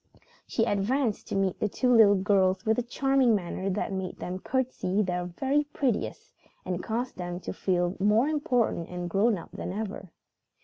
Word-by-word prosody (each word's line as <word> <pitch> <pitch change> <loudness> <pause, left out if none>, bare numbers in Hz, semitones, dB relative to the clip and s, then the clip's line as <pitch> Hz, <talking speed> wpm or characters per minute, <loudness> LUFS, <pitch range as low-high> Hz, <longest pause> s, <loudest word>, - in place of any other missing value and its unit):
She 225 - 0
advanced 220 +3 0
to - - -3
meet 195 -2 0
the 210 - 0
two 250 +4 +2
little 210 -3 +7
girls 190 -1 +2
with 220 +2 +2
a - - +2
charming 260 0 +2
manner 190 0 -3
that 195 +1 -2
made 190 -1 -4
them 185 +1 -5
curtsey 225 -5 -1
their 180 -1 -2
very 270 +12 0
prettiest 275 -6 -2 0.3
and 180 -1 -2
caused 240 +3 -3
them 175 -1 -4
to - - -5
feel 180 -1 0
more 210 +6 +3
important 250 - 0
and 180 0 -4
grown 200 +5 +2
up 165 - -10
than - - -5
ever. 200 -2 -5
205 Hz, 175 wpm, -28 LUFS, 185-245 Hz, 0.3 s, little